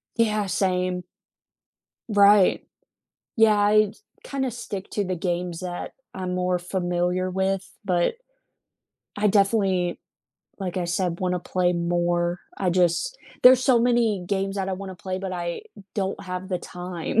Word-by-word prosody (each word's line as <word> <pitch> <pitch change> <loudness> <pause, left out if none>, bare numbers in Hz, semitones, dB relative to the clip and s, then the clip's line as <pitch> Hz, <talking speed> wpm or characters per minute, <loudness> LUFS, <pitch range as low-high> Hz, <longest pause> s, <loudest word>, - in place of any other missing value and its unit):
Yeah, 215 -3 +2
same. 180 -1 0 1.0
Right, 205 -2 +5 0.7
yeah, 220 -2 +5
I 210 0 +4 0.3
kinda 265 -2 -2
stick 205 -4 -6
to 205 - 0
the 185 -1 -2
games 175 -1 -2
that 180 -1 -5 0.2
I'm 185 -1 -4
more 180 0 0
familiar 180 0 -1
with, 190 +1 -1 0.2
but 180 - +1 1.0
I 210 +1 +3
definitely, 195 -3 +2 0.6
like, 190 -3 -4
I 180 - 0
said, 175 0 -1
wanna 180 -1 0
play 180 0 +1
more, 175 0 0 0.2
I 185 -2 0
just 180 - +1 0.3
there's 255 0 +8
so 255 -2 +5
many 230 -6 +2
games 195 +1 -1
that 195 -1 -1
I - - -1
wanna 190 0 -6
play, 185 +1 -4
but 190 -1 -4
I 175 -1 -3 0.3
don't 195 -2 -2
have 185 0 -5
the 185 -2 -1
time. 180 +3 -3
185 Hz, 140 wpm, -24 LUFS, 180-205 Hz, 1.0 s, there's